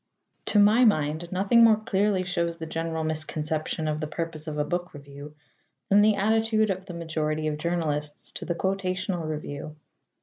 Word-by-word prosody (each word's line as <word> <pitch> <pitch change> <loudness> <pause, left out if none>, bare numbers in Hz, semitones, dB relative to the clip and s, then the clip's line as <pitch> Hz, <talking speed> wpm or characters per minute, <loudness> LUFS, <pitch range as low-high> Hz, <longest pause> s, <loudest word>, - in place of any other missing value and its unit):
To - - +2
my 210 +4 +6
mind, 160 -5 +1
nothing 200 +5 +4
more 225 -1 +7
clearly 205 -2 +1
shows 170 -2 -2
the 165 - -6
general 160 0 -3
misconception 155 0 -3
of 155 0 -1
the 155 - -3
purpose 160 0 -5
of 150 -1 -4
a 150 - +1
book 175 +2 -3
review 145 +1 -11 0.5
than 200 +1 +6
the 215 0 +4
attitude 220 +1 +2
of 190 0 -5
the 175 - -7
majority 155 -2 -2
of 150 -1 -2
journalists 150 -3 -2
to - - -7
the 170 - -2
quotational 185 -2 -2
review. 150 0 -6
170 Hz, 170 wpm, -26 LUFS, 155-195 Hz, 0.5 s, more